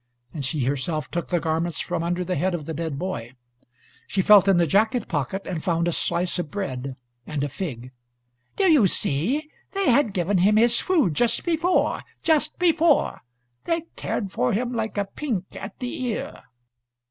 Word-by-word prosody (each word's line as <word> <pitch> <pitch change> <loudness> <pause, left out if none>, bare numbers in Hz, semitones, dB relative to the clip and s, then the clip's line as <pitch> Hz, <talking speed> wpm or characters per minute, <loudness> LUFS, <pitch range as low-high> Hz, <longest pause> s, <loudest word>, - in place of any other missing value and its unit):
And 150 - -4
she 140 +1 -1
herself 145 +4 -2
took 170 0 -2
the 175 - +1
garments 165 +2 -1
from 175 -1 -2
under 175 +2 -1
the 180 +1 -2
head 185 0 0
of 155 -4 -6
the 160 - -4
dead 160 -2 -3
boy; 130 -9 -5 0.7
she 190 - 0
felt 205 -1 +7
in 195 -2 +5
the 170 - +4
jacket 220 - +2
pocket 165 +5 -2
and 170 -4 -4
found 170 -1 +1
a - - +2
slice 180 +2 -1
of 175 - -3
bread 135 -9 -4 0.3
and 150 -2 -2
a - - 0
fig. 130 -7 -6 0.6
"Do 400 - 0
you 305 - +6
see? 245 - 0 0.2
They 390 -8 +2
had 235 -4 +3
given 185 +1 +1
him 205 +4 +4
his 235 +1 +4
food 315 - +2
just 235 +8 +1
before, 345 +1 +1 0.2
just 315 -3 +2
before. 335 -3 +3 0.4
They 335 0 0
cared 200 -4 -3
for 125 - 0
him 245 +4 -1
like 220 -2 -3
a 200 - +1
pink 205 -3 -3
at 195 +1 -8
the 250 0 -5
ear." 245 -4 -4
185 Hz, 180 wpm, -24 LUFS, 160-235 Hz, 0.7 s, felt